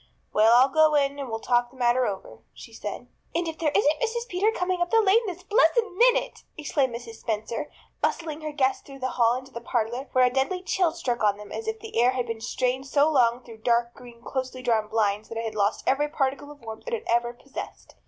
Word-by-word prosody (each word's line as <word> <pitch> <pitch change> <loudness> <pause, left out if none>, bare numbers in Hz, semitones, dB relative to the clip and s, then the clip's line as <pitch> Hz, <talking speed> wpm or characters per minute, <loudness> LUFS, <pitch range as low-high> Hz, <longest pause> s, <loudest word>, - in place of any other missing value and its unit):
"Well, 220 +2 +5
I'll 255 +2 +7
go 310 +1 +4
in 280 0 +1
and 275 -3 -5
we'll 225 - -2
talk 240 +1 +1
the 260 - -19
matter 245 0 +2
over," 195 -2 -6 0.2
she - - -12
said. - - -6 0.3
"And 340 0 0
if 320 -1 -5
there 320 -2 +2
isn't 300 +1 +3
Mrs. 475 +1 -1
Peter 385 +5 +1
coming 360 -3 -1
up 350 - +1
the 455 - +4
lane 435 +2 +4
this 365 -1 -6
blessed 440 +4 +4 0.2
minute!" - - +3 0.2
exclaimed 280 -5 0
Mrs. 235 -1 -8
Spencer, 225 +4 -3 0.3
bustling 315 -2 -1
her 305 0 -4
guests 270 -3 +1
through 275 -1 -12
the 260 -1 -2
hall 235 -1 +3
into 260 +1 -7
the 235 - -7
parlor, 240 +3 -2
where 255 -1 +5
a 250 - +1
deadly 275 +8 0
chill 365 -3 +1
struck 250 -9 -2
on 205 -1 +3
them 210 0 -11
as 450 - -5
if 445 0 -2
the 445 - -1
air 250 +2 +4
had 250 -2 -1
been 230 -1 -5
strained 255 +3 -1
so 285 +3 +3
long 245 -3 +3
through 230 -2 -12
dark 235 +1 +1
green, 240 -1 -14
closely 260 -1 -4
drawn 225 -4 +1
blinds 210 -1 0
that 230 - -6
it 230 - -2
had 220 - -3
lost 205 0 0
every 290 +3 +2
particle 285 -1 -2
of 295 -2 -13
warmth 225 - -9
it - - -3
had 450 - -7
ever 240 0 +1
possessed. 265 +3 -9
260 Hz, 235 wpm, -26 LUFS, 235-315 Hz, 0.3 s, I'll